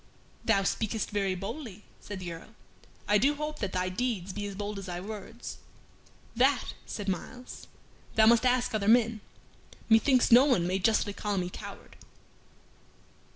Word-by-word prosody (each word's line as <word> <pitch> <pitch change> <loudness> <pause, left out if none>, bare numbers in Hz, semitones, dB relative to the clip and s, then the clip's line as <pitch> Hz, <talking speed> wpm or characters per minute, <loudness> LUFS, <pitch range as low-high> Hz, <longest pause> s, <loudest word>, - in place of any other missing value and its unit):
"Thou 200 -3 +3
speakest 220 +2 -1
very 195 -2 0
boldly," 205 +1 -7 0.2
said 205 -2 -7
the 175 -2 -5
Earl. 165 +7 -12 0.5
"I 210 0 +4
do 285 +6 +3
hope 300 +1 -4
that 200 -3 -2
thy 185 0 -1
deeds 195 -2 -2
be 205 +1 -4
as 200 - -7
bold 205 0 -4
as 195 - -8
thy 175 -1 -4
words." 215 +4 -8 0.8
"That," 260 +2 +3 0.2
said 205 -2 -5
Myles, 245 +7 -5 0.5
"thou 220 - +6
must 235 +2 +6
ask 250 -1 +2
other 205 -2 -1
men. 225 -1 +4 0.7
Methinks 240 +3 +4
no 245 +3 +9
one 245 -12 +2
may 185 +2 0
justly 215 0 +2
call 205 0 -2
me 180 -1 -2
coward." - - -10
210 Hz, 155 wpm, -29 LUFS, 195-240 Hz, 0.8 s, no